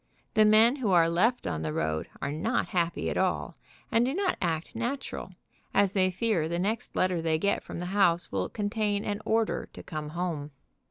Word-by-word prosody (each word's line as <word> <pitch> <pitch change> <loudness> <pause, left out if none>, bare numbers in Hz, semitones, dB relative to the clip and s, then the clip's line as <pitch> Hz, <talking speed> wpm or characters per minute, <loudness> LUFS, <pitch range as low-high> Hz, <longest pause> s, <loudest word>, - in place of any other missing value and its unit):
The 215 -2 +5
men 220 +5 +6
who 245 -7 -1
are 170 -3 +5
left 200 +9 +2
on 80 -3 -2
the 80 -1 -2
road 80 0 -1
are 140 - -1
not 170 +11 -1
happy 170 -3 0
at - - -2
all, - - 0 0.4
and 230 -1 +4
do 265 +4 0
not 390 -1 +1
act 170 +3 -2
natural, 240 +4 -4 0.4
as 200 -2 +4
they 185 -2 +2
fear 185 -4 0
the 170 - -1
next 210 +5 -2
letter 185 -2 +1
they 160 -1 +1
get 200 +5 +1
from - - -8
the 175 - -4
house 175 -4 +3
will 95 -2 -1
contain 205 -1 -1
an 205 0 -2
order 225 0 0
to - - -10
come 155 -3 -5
home. 165 -3 -3
185 Hz, 200 wpm, -28 LUFS, 165-220 Hz, 0.4 s, men